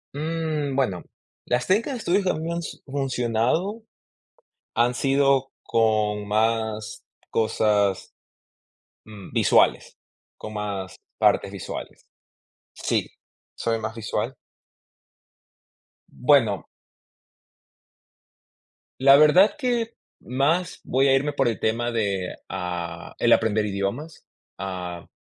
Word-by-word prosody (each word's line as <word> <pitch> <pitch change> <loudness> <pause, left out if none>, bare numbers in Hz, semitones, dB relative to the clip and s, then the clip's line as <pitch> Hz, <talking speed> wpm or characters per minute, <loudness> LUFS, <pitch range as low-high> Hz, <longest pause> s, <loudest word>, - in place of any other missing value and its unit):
Mm, 155 -2 -2
bueno, 100 -11 0 0.4
las 125 0 0
técnicas 220 +9 +1
de 250 - -3
estudio 195 -2 +1
que 185 - +1
me 165 +1 -3
han 170 - -2
s 170 - -7
funcionado, 135 - -1 0.9
han 120 +2 +2
sido 135 0 +2
con 105 -2 +1
más 110 0 -1 0.3
cosas, 105 -3 +1 0.9
mm, 105 -3 -11
visuales, - - +3 0.4
con 110 - -8
más 100 -3 -4 0.2
partes - - +3
visuales. - - -7 0.7
Sí, - - -1 0.4
soy 115 -1 -1
más 110 0 -4
visual. 115 -3 -3 1.7
Bueno 120 - +2 2.3
la 135 +1 +8
verdad 155 +7 +6
que, 240 -4 -1 0.2
más 150 +8 0
voy 135 +2 +2
a 135 - +5
irme 145 +2 0
por 135 -2 +1
el 115 -4 -1
tema 120 +2 0
de, 100 -5 -1
ah, 85 -2 -5
el - - +5
aprender 110 -1 +2
idiomas, 100 +11 -4 0.3
ah, 90 -3 -5
120 Hz, 100 wpm, -24 LUFS, 105-145 Hz, 2.3 s, la